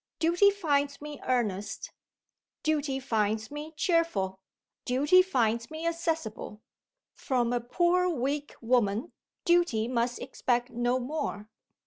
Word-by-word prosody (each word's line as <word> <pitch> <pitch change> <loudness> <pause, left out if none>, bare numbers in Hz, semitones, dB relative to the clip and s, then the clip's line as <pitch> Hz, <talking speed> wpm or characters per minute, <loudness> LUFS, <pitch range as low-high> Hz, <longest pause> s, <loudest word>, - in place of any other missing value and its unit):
Duty 345 +5 +4
finds 290 -8 0
me 295 -1 -8
earnest; 210 -6 -1 0.7
Duty 295 -3 0
finds 220 -3 -1
me 295 +2 -6
cheerful; 265 - +1 0.4
Duty 290 +9 +5
finds 235 -10 0
me 315 +1 -6
accessible. 325 -11 -3 0.5
From 245 -3 0
a 240 - 0
poor, 350 +8 +2
weak 285 -1 -2
woman, 230 +2 +1 0.3
Duty 345 -11 +3
must 240 0 0
expect 245 -1 -1
no 240 +1 +1
more. 245 -5 -4
265 Hz, 110 wpm, -29 LUFS, 235-320 Hz, 0.7 s, Duty